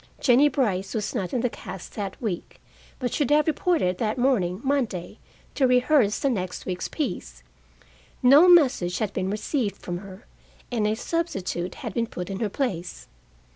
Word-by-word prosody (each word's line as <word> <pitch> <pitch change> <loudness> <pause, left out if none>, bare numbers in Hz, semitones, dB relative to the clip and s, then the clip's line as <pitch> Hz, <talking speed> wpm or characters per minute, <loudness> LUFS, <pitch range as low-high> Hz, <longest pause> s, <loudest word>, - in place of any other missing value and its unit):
Jennie 265 +3 +5
Brice 200 -9 -1
was 210 -2 -2
not 195 -8 -2
in 250 - 0
the 250 - +2
cast 185 -3 -9
that 200 -3 -5
week, 205 -7 -4 0.4
but 250 -3 -3
should 290 -5 0
have 300 0 +4
reported 310 - +1
that 220 0 -1
morning 210 -9 +1
(Monday) 250 -11 -1 0.3
to 265 - +3
rehearse 250 -3 +3
the - - 0
next 185 -5 -4
week's 180 -1 -3
piece. 65 - -4 0.8
No 285 +8 +8
message 260 - +4
had 215 -3 -2
been 185 0 -1
received 210 0 -1
from 175 -3 -5
her, 195 +2 -12 0.5
and 220 -3 +1
a 215 - +1
substitute 195 - -3
had - - -4
been 230 -1 0
put 180 -2 -6
in 195 - -4
her 220 - -1
place. 190 -8 -3
220 Hz, 170 wpm, -25 LUFS, 185-265 Hz, 0.8 s, No